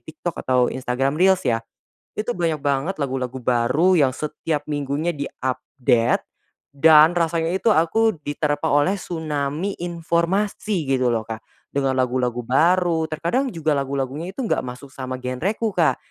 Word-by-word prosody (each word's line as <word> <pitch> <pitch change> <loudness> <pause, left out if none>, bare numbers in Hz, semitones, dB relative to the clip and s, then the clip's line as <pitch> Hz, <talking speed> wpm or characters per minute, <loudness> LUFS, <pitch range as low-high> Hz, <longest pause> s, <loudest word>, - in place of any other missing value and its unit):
TikTok 160 +2 -6
atau 125 -1 +2
Instagram 130 +2 -1
Reels 190 0 +4
ya. 115 -1 +2 0.6
Itu 220 +3 -2
banyak 165 -4 0
banget 140 +6 0
lagu-lagu 130 -2 -2
baru 125 +10 +3
yang 135 -5 +3
setiap 150 +1 -3
minggunya 145 +2 -1
di-update, 125 -3 0 0.6
dan 160 +3 +7
rasanya 165 0 +1
itu 215 +3 +3
aku 220 +7 +2
diterpa 145 0 -1
oleh 145 +6 +3
tsunami 155 +2 -3
informasi 175 +2 -1
gitu 130 -2 +2
loh 115 -2 -1
Kak. 110 0 -6 0.3
Dengan 135 -1 +1
lagu-lagu 125 -1 0
baru, 165 +4 +3
terkadang 175 - 0
juga 160 -2 0
lagu-lagunya 140 +4 -3
itu 220 - -11
enggak - - 0
masuk 125 +2 -8
sama 130 -1 -5
genreku 185 - -2
Kak. 155 -8 +2
150 Hz, 140 wpm, -22 LUFS, 130-170 Hz, 0.6 s, dan